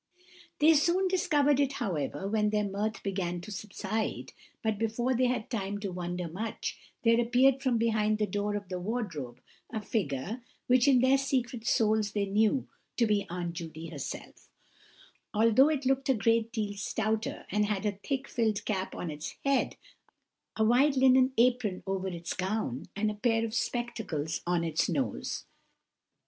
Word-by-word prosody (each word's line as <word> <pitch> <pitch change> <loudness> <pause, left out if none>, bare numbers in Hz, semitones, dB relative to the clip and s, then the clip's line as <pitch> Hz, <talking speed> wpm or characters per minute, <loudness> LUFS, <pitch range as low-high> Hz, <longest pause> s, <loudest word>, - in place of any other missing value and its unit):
They 310 +2 +6
soon 345 +5 +3
discovered 295 -6 +3
it, 280 -1 +2
however, 180 - -2
when 210 0 +2
their 210 0 +1
mirth 210 +3 -3
began 185 -3 -2
to 210 - -9
subside; 210 +2 -3 0.3
but 220 -2 0
before 230 +3 0
they 250 +1 +3
had 245 -3 -1
time 205 -3 -2
to 200 -2 -3
wonder 180 0 -3
much, 205 +7 -4 0.3
there 230 0 +5
appeared 255 +3 +4
from 260 -4 +2
behind 215 -2 +2
the 210 - +1
door 205 +1 -2
of 205 -2 -4
the 180 -1 -4
wardrobe 175 - -4 0.3
a 225 - -2
figure, 200 - -2 0.2
which 250 +1 +4
in 260 -3 +6
their 265 +1 +4
secret 250 -4 -1
souls 215 -2 +2
they 205 -1 +1
knew 215 +6 +2 0.3
to 235 - +4
be 210 -2 +1
Aunt 175 -1 -3
Judy 165 -1 -7
herself, 145 -5 -7 0.9
although 230 +6 +5
it 290 -3 -1
looked 270 +1 +1
a 265 - +5
great 230 +1 +2
deal 215 -3 -2
stouter, 215 +2 -2
and 210 0 +2
had 210 -1 -1
a 205 -1 -1
thick 275 +4 -2
filled 220 -3 0
cap 190 -2 -2
on 170 - -4
its 150 +1 -6
head, 275 -1 +2 0.8
a 220 - +2
white 265 +5 +4
linen 260 0 +5
apron 240 -5 +2
over 190 -1 -2
its 170 -2 -4
gown, 185 - -2
and 210 +1 +1
a - - -4
pair 225 +2 +1
of 220 - -5
spectacles 225 - -2
on 175 -1 +1
its 160 -1 0
nose. 265 - -2
215 Hz, 165 wpm, -30 LUFS, 195-245 Hz, 0.9 s, They